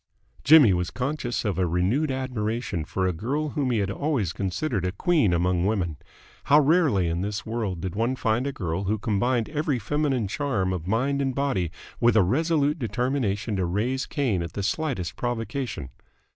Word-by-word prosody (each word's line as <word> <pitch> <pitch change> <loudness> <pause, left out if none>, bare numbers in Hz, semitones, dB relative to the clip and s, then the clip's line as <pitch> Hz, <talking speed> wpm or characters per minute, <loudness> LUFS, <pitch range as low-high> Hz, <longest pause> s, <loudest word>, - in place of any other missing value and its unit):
Jimmy 145 -10 +7
was 90 0 -1
conscious 125 -2 -3
of 100 -3 -1
a 90 - +2
renewed 95 - +1
admiration 115 - -2
for 95 +4 -2
a 90 - +1
girl 140 - -2
whom 140 -3 -1
he 120 - +1
had 100 -2 0
always 120 - -1
considered 100 - -2
a 90 - 0
queen 135 - +2
among 90 +1 +1
women. 90 -8 -1 0.5
How 145 +1 +6
rarely 145 - +3
in 85 +1 -1
this 100 +1 -3
world 110 -7 -3
did 95 -1 -3
one 115 +4 0
find 120 +1 0
a - - -1
girl 95 - -3
who 105 +3 0
combined 115 +3 0
every 150 -3 0
feminine 135 -1 0
charm 100 -7 -1
of 90 -2 -5
mind 135 +7 +1
and 135 -2 -1
body 135 - 0 0.3
with 120 -1 +4
a 110 - +6
resolute 150 - +1
determination 115 -4 -1
to 95 - 0
raise 115 +9 -1
Cain 120 - 0
at 85 -1 -5
the 100 - -3
slightest 120 - -2
provocation! 120 - -3
115 Hz, 180 wpm, -25 LUFS, 95-140 Hz, 0.5 s, Jimmy